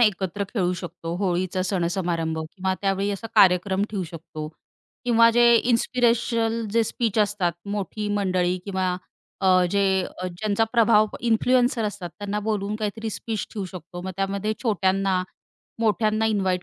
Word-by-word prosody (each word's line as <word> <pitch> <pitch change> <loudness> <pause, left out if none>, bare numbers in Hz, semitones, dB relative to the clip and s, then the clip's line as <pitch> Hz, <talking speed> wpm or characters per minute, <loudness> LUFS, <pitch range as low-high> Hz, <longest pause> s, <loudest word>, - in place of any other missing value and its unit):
एकत्र 200 -3 +1
खेळू 180 -5 0
शकतो, 170 -1 -6
होळीचा 185 -1 0
सणसमारंभ 170 -3 -1
किंवा 185 +4 -3
त्यावेळी 195 0 0
असा 200 +3 -4
कार्यक्रम 190 +1 +4
ठेवू 200 -3 -2
शकतो. 160 -2 -7 0.6
किंवा 230 -1 +5
जे 235 0 +5 0.2
इन्स्पिरेशनल 230 -1 +1
जे 230 0 +4
स्पीच 225 -1 -1
असतात. 205 -4 +1 0.2
मोठी 210 +1 -3
मंडळी 185 -2 +1
किंवा 185 -2 -1 0.4
अ, 185 -1 +4
जे 200 0 +2 0.4
अ, 185 - -3
ज्यांचा 200 +4 0
प्रभाव 225 -2 +5
इन्फ्लुएन्सर 245 0 +2
असतात. 195 -4 -4
त्यांना 205 0 -3
बोलवून 210 -1 -2
काहीतरी 220 +1 -3
स्पीच 220 -1 -4
ठेवू 205 - -3
शकतो. 175 0 -9
मग 190 - -4
त्यामध्ये 200 +2 -1
छोट्यांना, 195 -3 +1 0.6
मोठ्यांना 215 0 +2
इन्व्हाईट 190 -4 0
200 Hz, 135 wpm, -24 LUFS, 185-220 Hz, 0.6 s, किंवा